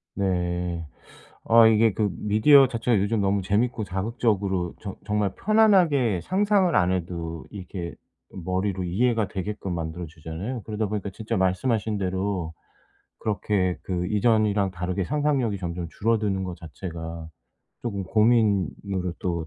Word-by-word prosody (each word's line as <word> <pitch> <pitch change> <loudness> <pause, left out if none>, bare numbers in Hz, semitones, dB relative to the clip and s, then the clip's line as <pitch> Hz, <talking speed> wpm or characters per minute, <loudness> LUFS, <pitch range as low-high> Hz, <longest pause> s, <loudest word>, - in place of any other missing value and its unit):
네. 90 -3 -1 0.6
아 115 0 +7
이게 110 -1 +4
그 105 0 0
미디어 110 - +5
자체가 115 -3 +1
요즘 105 +2 0
너무 100 0 +1
재밌고 110 +4 0
자극적으로 95 -3 -1
저 100 -3 -6
정말 105 -2 0
편안하게 175 - +3
상상을 195 -2 +2
안 90 +1 +3
해도 85 -2 -4
이렇게 90 -3 -6 0.4
머리로 95 +1 -2
이해가 110 +4 +1
되게끔 100 -1 -4
만들어 85 +1 -4
주잖아요. 80 +10 -6
그러다 110 -1 -2
보니까 100 -1 -3
진짜 110 +2 -3
말씀하신 105 +3 0
대로 95 -3 -2 0.7
그렇게 100 -3 0
그 90 -1 -2
이전이랑 105 -2 +2
다르게 90 +1 -2
상상력이 140 - 0
점점 85 -1 -4
줄어드는 105 -3 0
거 90 - -5
자체가 80 0 -7 0.5
쪼금 100 -5 -3
고민으로 100 -4 +1
또 85 -3 -2
100 Hz, 310 characters per minute, -25 LUFS, 90-110 Hz, 0.7 s, 아